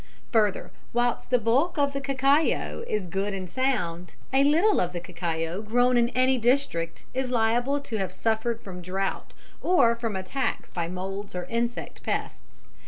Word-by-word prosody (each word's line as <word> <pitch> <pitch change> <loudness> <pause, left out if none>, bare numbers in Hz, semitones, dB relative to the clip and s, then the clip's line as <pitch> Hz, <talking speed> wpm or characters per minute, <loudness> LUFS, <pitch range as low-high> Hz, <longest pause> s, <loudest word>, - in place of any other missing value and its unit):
Further, 210 -4 +2 0.2
whilst 240 0 0
the 250 - +4
bulk 255 +10 +2
of 280 -1 +2
the 275 - -2
cacao 275 - +1
is 210 -3 -1
good 195 +3 -2
and 185 -1 -5
sound, 180 -8 -1 0.2
a 270 +1 +5
little 335 +9 +4
of 180 0 -1
the 175 - -3
cacao 170 +1 -3
grown 245 +3 +3
in 235 0 +4
any 255 0 +3
district 230 -10 0
is 260 0 -1
liable 240 +4 +2
to 230 -5 -4
have 190 -3 -2
suffered 225 +3 -1
from 180 -2 -8
drought 190 +2 -3 0.3
or 270 -11 +4
from 230 -3 -3
attacks 190 +9 -2
by 170 -2 -2
moulds 190 +2 -5
or 180 - -2
insect 235 +1 -2
pests. - - -5
230 Hz, 165 wpm, -26 LUFS, 185-260 Hz, 0.3 s, a